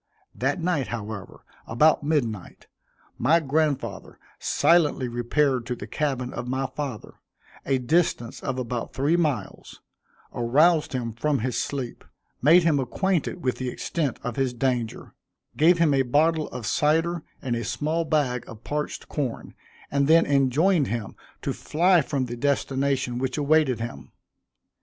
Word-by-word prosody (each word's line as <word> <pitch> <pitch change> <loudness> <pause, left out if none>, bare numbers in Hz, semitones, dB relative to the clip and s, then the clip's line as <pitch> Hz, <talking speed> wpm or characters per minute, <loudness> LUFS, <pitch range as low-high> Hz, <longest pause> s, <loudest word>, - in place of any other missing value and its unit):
That 135 +6 -1
night, 165 -6 0
however, 110 -4 -7 0.2
about 150 +8 +4
midnight, 120 - -2 0.5
my 165 +2 +4
grandfather 150 -1 -1 0.2
silently 155 -6 +2
repaired 120 +1 0
to 125 - -2
the - - -8
cabin 135 -5 -2
of 120 +1 -5
my 130 +2 -1
father, 130 -4 -6 0.5
a 135 - +2
distance 125 -2 0
of 130 -1 -3
about 120 -2 -4
three 145 +5 +2
miles, 155 -7 -2 0.5
aroused 150 +7 +3
him 120 -3 -3
from 140 +3 0
his 125 0 -2
sleep, 130 -4 -5 0.4
made 165 +6 +6
him 160 -4 +3
acquainted 175 +6 -1
with 125 - 0
the 130 -1 -3
extent 145 +1 -2
of 125 -2 -4
his 130 -2 0
danger, 120 -3 -2 0.4
gave 170 +4 +5
him 165 -4 +3
a 135 - +3
bottle 155 +5 +2
of 120 - -7
cider 165 +7 +1 0.2
and 125 -3 -2
a 115 - -3
small 155 +8 -1
bag 145 -6 0
of 115 -1 -11
parched 150 0 -4
corn, 135 -6 -4 0.4
and 140 0 +2
then 165 +2 +6
enjoined 145 +4 +3
him 115 -3 -4 0.3
to - - -1
fly 175 +2 +3
from 140 -3 -2
the 120 -1 -5
destination 135 -1 0
which 130 +1 -2
awaited 145 -4 +2
him. 90 - -7
135 Hz, 145 wpm, -25 LUFS, 125-155 Hz, 0.5 s, made